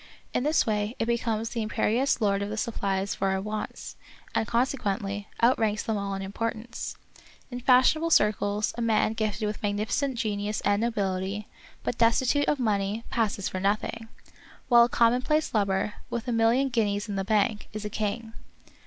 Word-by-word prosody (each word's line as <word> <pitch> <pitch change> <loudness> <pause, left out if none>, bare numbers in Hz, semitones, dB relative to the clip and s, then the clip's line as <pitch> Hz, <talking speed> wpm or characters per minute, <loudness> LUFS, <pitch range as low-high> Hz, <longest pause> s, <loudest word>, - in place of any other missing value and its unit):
In - - +1
this 305 +3 +3
way 210 +1 -1
it - - 0
becomes 230 -1 -1
the 230 - -3
imperious 230 +5 +1
lord 200 -3 +1
of 200 - -2
the 215 - -4
supplies 200 -3 -1
for 195 - -1
our 190 0 +1
wants, 210 +2 -5 0.4
and, 220 - 0
consequently, 205 -5 -1 0.2
outranks 220 -3 +3
them 220 - -1
all 200 -1 -2
in 195 - -4
importance. 230 +4 -4 0.6
In 245 - -4
fashionable 260 +6 +4
circles 210 -5 +2
a 240 - -4
man 225 -1 +2
gifted 215 -1 -2
with 210 0 -3
magnificent 215 +6 -1
genius 210 -1 -1
and 205 +1 +2
nobility, 200 -2 -1 0.4
but 240 - -3
destitute 250 +5 +3
of 295 - +2
money, 210 -2 0
passes 210 -4 0
for 185 - -3
nothing; 215 +3 -1 0.6
while 235 -1 +8
a - - -4
com 230 0 +4
monplace 305 +3 0
lubber, 200 -1 +1 0.2
with 235 +1 -4
a - - 0
million 235 +4 +3
guineas 210 -3 0
in 205 - -4
the 195 - -1
bank, 210 +1 +1
is 215 0 -6
a - - -2
king. 220 +2 -3
215 Hz, 170 wpm, -27 LUFS, 205-235 Hz, 0.6 s, while